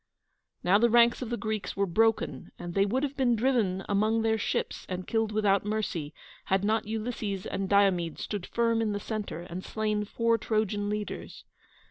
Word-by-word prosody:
Now 190 +3 +5
the 235 +1 +4
ranks 235 +1 +5
of 245 - -4
the 240 - -2
Greeks 215 -5 -3
were 200 - +2
broken, 225 +5 +1
and 175 0 -6
they 195 +2 +3
would 255 +7 0
have 280 -1 -2
been 255 -4 +2
driven 220 -6 +1
among 215 +3 +2
their 220 0 +2
ships - - -2
and 185 0 -4
killed 225 -1 0
without 205 -2 +2
mercy, 205 -8 -2 0.3
had 190 +1 +1
not 215 +1 +1
Ulysses 215 -3 -3
and 195 -1 -3
Diomede 190 -5 +3
stood 205 -4 -4
firm 230 -1 +1
in 215 -2 0
the 205 - -2
centre, 210 -6 -4
and 175 +1 -7
slain 215 -1 -1
four 230 +2 +1
Trojan 210 -2 0
leaders. 210 0 -5
215 Hz, 180 wpm, -29 LUFS, 195-225 Hz, 0.3 s, Now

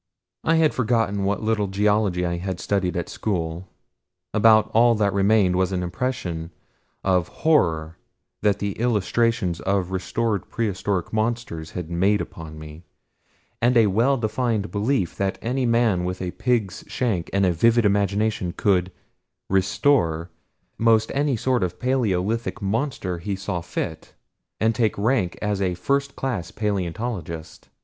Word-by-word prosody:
I 165 - +3
had 160 -2 +3
forgotten 110 -5 +1
what 100 +1 -1
little 110 -2 +1
geology 100 -2 +1
I 85 0 -1
had 90 0 -4
studied 95 -3 -1
at 85 - -2
school 85 -3 -3 0.7
about 110 0 +5
all 115 +1 +5
that 100 -2 +1
remained 100 -2 +3
was 95 0 +1
an 90 -1 -1
impression 85 -4 -3 0.5
of 90 -3 +2 0.2
horror 85 - +2 0.4
that 100 -2 +2
the 100 0 -2
illustrations 115 -4 +1
of 95 -2 -1
restored 100 +1 -1
prehistoric 100 -4 -2
monsters 110 -8 -2
had 85 -2 -5
made 95 +5 +2
upon 80 -2 -7
me, 75 +1 -10 0.8
and 120 +1 +4
a 115 - +6
well 115 +8 +2
defined 110 -2 -1
belief 105 -2 0
that 95 -1 -1
any 125 +2 -1
man 115 -6 +2
with 90 +1 -3
a 90 -1 -3
pig's 110 -5 -1
shank 105 -10 -1
and 100 0 +2
a 90 - +2
vivid 115 +7 +3
imagination 100 -2 +1
could 95 -3 +2 0.6
"restore" 95 - +2 0.5
most 110 -1 +3
any 140 -2 +1
sort 130 +2 +1
of 90 -1 -2
paleolithic 115 -3 0
monster 100 - -2
he 100 +3 -3
saw 95 -2 -3
fit, 85 -2 -5 0.4
and 110 +1 +2
take 110 -3 0
rank 105 -4 +1
as 105 -1 -1
a 90 -2 0
first 140 +9 -1
class 120 -10 -3
paleontologist. 95 -5 -4
100 Hz, 140 wpm, -23 LUFS, 90-115 Hz, 0.8 s, a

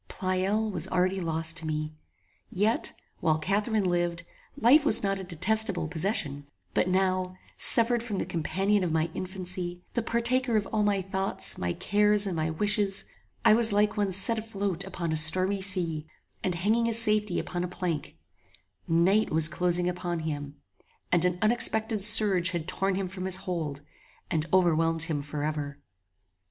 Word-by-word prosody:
Pleyel 195 +3 -1
was 175 -2 0
already 185 +1 0
lost 165 0 -1
to 160 -1 -2
me; 155 0 -3 0.6
yet, 210 +5 0 0.3
while 155 -2 +1
Catharine 205 +6 0
lived 175 -2 -1 0.3
life 275 +6 +5
was 295 - +5
not 195 -1 0
a - - -6
detestable 190 +1 +1
possession: 155 -5 -3 0.3
but - - +1
now, 185 0 0 0.2
severed 235 0 +4
from 225 -4 -4
the - - -2
companion 190 +5 0
of 175 - -1
my 160 +1 0
infancy, 180 -1 -5
the 235 - 0
partaker 235 +1 0
of 205 - -1
all 215 - +2
my 205 -2 +1
thoughts, 195 +1 -2
my 90 0 -2
cares, 210 - +2
and 190 -3 -3
my 160 0 -1
wishes, 200 +3 0 0.4
I - - +7
was 225 0 +4
like 205 +1 +2
one 205 -2 0
set 205 +5 +4
afloat 200 -4 -3
upon 175 -4 -4
a - - 0
stormy 185 +5 +2
sea, 170 -5 -1 0.4
and 180 -2 -1
hanging 215 +7 +1
his 230 0 +2
safety 210 -4 +1
upon 175 0 -3
a - - -2
plank; 175 -4 -4 0.7
night 185 +6 +3
was 155 0 +6
closing 175 +1 0
upon 175 -2 -3
him, 145 -2 -5 0.6
and 175 -1 +2
an 180 -1 0
unexpected 220 -1 +1
surge 205 -4 +5
had 170 -3 -4
torn 195 0 -1
him 195 0 -2
from 185 0 -6
his 190 -1 +1
hold 155 -6 -4 0.5
and 160 0 -1
overwhelmed 165 -3 +2
him 160 -4 -2
forever. 145 0 -4
185 Hz, 165 wpm, -27 LUFS, 165-210 Hz, 0.7 s, I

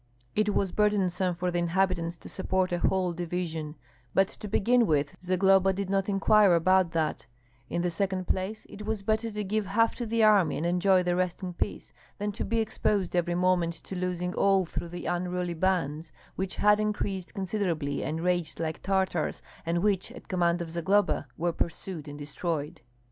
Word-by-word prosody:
It 210 -1 +1
was 195 -2 +1
burdensome 190 -4 +1
for 180 +1 -1
the 175 - 0
inhabitants 170 -1 0
to - - -12
support 190 -1 -1
a 175 - 0
"whole 185 -1 +1
division:" 165 -3 -4 0.4
but 195 0 +5
to 210 - -8
begin 235 +4 +3
with, 145 -2 +1
Zagloba 190 +1 +3
did 195 0 -3
not 195 0 +1
inquire 200 -1 +5
about 185 +1 +3
that; 155 -7 -1 0.4
in 170 - -1
the 175 - 0
second 185 +1 -1
place, 195 +4 -2
it 210 - -9
was 215 -1 -3
better 220 +2 0
to 210 -1 -4
give 205 +1 -1
half 225 +4 +2
to 240 - -3
the 225 0 +2
army 205 -7 +5
and 160 - -2
enjoy 180 +1 +3
the 175 0 +1
rest 180 +1 -1
in 180 -1 -4
peace, 200 - -4 0.2
than 205 +1 -2
to - - -4
be 230 - -1
exposed 210 -4 0
every 175 0 +1
moment 175 -2 +2
to 190 - -8
losing 180 0 -2
all 195 -1 +3
through 170 0 -5
the 175 +1 -7
unruly 180 0 -1
bands, 165 -3 -1 0.2
which 190 0 -3
had 210 0 +4
increased 205 -3 -2
considerably 180 -8 -1
and 160 +2 -3
raged 175 -3 0
like 160 -1 -3
Tartars, 190 -4 0 0.2
and 170 +2 0
which, 200 -3 +1
at - - -12
command 175 -2 +1
of 165 - -8
Zagloba, 190 +5 +1
were 170 +1 0
pursued 165 -2 -4
and 145 0 -7
destroyed. 150 +2 -4
185 Hz, 185 wpm, -28 LUFS, 170-195 Hz, 0.4 s, but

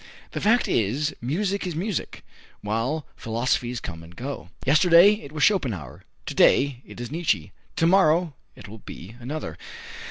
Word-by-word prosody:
The - - -4
fact 230 +3 +3
is, 130 +9 0
music 190 - -1
is 175 - -4
music, 190 +3 -4 0.4
while 115 +9 -2
philosophies 120 +1 -1
come 85 -5 -7
and 85 +1 -14
go. 125 -8 -6 0.2
Yesterday 170 +6 +7
it 140 - -10
was 155 -1 -2
Schopenhauer; 115 - 0 0.2
to - - -4
day 135 -2 +4
it - - -11
is 120 +1 -6
Nietzsche; 125 - -1 0.2
to 165 - +2
morrow 170 -2 +4 0.2
it - - -12
will 110 +2 -10
be 100 +2 -10
another. 140 +6 -6
140 Hz, 155 wpm, -25 LUFS, 115-170 Hz, 0.4 s, Yesterday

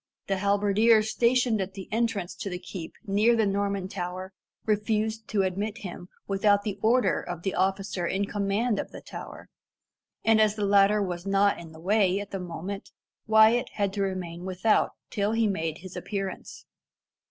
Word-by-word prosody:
The 195 - -1
halberdier 205 +3 +4
stationed 235 0 +2
at 190 0 -5
the 190 -2 -7
entrance 215 -5 -1
to 200 - -5
the 180 - -4
keep 180 -2 -8
near 215 +3 +3
the 225 -2 +2
Norman 200 -1 -1
Tower 185 0 -5 0.3
refused 215 +1 0
to 200 -2 +1
admit 200 +4 -2
him 180 -4 -8 0.2
without 205 +1 +3
the 205 -1 -4
order 240 +3 +3
of 175 -1 -7
the 190 - -1
officer 190 -1 0
in 195 +3 0
command 205 +2 0
of - - -4
the - - -10
tower, - - -9 0.8
and 225 -1 +5
as 215 -1 +3
the 210 -2 -1
latter 200 +1 +4
was 175 0 -4
not 200 +1 +3
in 165 -2 -10
the 160 - -13
way 195 +1 +2
at 205 -1 -7
the 195 - -3
moment, 180 +3 -6 0.4
Wyat 220 +2 +5
had 200 -2 -1
to 200 - -2
remain 180 -3 -3
without 190 +4 +1 0.2
till 205 +1 0
he 225 0 +2
made 165 -6 -1
his 185 0 -11
appearance. 195 -2 -5
200 Hz, 175 wpm, -27 LUFS, 185-215 Hz, 0.8 s, and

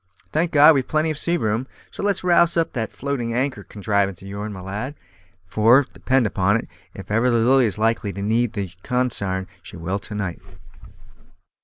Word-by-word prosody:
Thank 165 +3 +1
God, 150 +1 +7
we've 135 -3 0
plenty 155 +1 +1
of 155 - -5
sea 175 +1 0
room; 110 -1 -1 0.2
so - - -7
let's 200 -2 0
rouse 170 -1 +4
up 165 - 0
that 115 -4 -3
floating 125 -4 -3
anchor 130 -4 -1
contrivance 100 -3 -1
of - - -9
yourn, 100 +2 -5
my 95 - -8
lad, 105 +9 -5 0.5
for, 115 +8 +4
depend 130 -2 +1
upon 100 +1 +2
it, - - -6 0.3
if - - -9
ever 115 +4 +3
the 120 - +2
Lily 125 +2 +4
is 105 - 0
likely 110 -1 0
to 100 - -6
need 115 +2 +1
the 100 -5 -4
consarn, 100 -7 0 0.2
she - - -11
will 90 +4 -3
to 105 +1 -8
night." 95 -4 -4
115 Hz, 190 wpm, -22 LUFS, 100-135 Hz, 0.5 s, God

